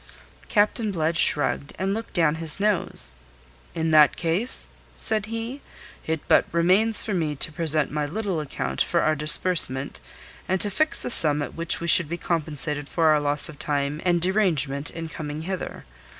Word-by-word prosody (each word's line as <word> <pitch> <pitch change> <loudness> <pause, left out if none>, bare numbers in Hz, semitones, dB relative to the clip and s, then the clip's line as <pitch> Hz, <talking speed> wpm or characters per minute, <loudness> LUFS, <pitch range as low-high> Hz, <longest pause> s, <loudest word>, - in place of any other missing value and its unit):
Captain 210 +1 0
Blood 165 -2 -2
shrugged, 145 -3 +1
and 190 +1 -2
looked 225 +2 -7
down 165 -4 +1
his 160 +2 +3
nose. 190 - +1 0.6
"In 160 0 -2
that 150 -2 +4
case," 180 +9 -1 0.3
said 215 -1 -1
he, 230 +5 -7 0.5
"it 160 -1 -3
but - - +3
remains 185 +7 +2
for 215 - -5
me 160 -5 -2
to 150 - 0
present 155 -2 -1
my 150 0 -3
little 195 0 -4
account 150 -2 -5
for 170 - 0
our 155 - +1
disbursement, 150 -3 0 0.5
and 190 0 0
to 205 - +3
fix 310 +10 +1
the - - -2
sum 150 -7 +7
at - - -8
which 170 0 +1
we 170 - -6
should 170 -2 +6
be 170 - -5
compensated 150 -4 -1
for 165 -2 +1
our 155 -1 +3
loss 145 0 +1
of 155 -4 -12
time 145 +1 -3
and 175 -2 0
derangement 160 -8 +1
in 165 -1 -8
coming 155 -1 -8
hither. 190 +1 -7
165 Hz, 175 wpm, -23 LUFS, 150-190 Hz, 0.6 s, sum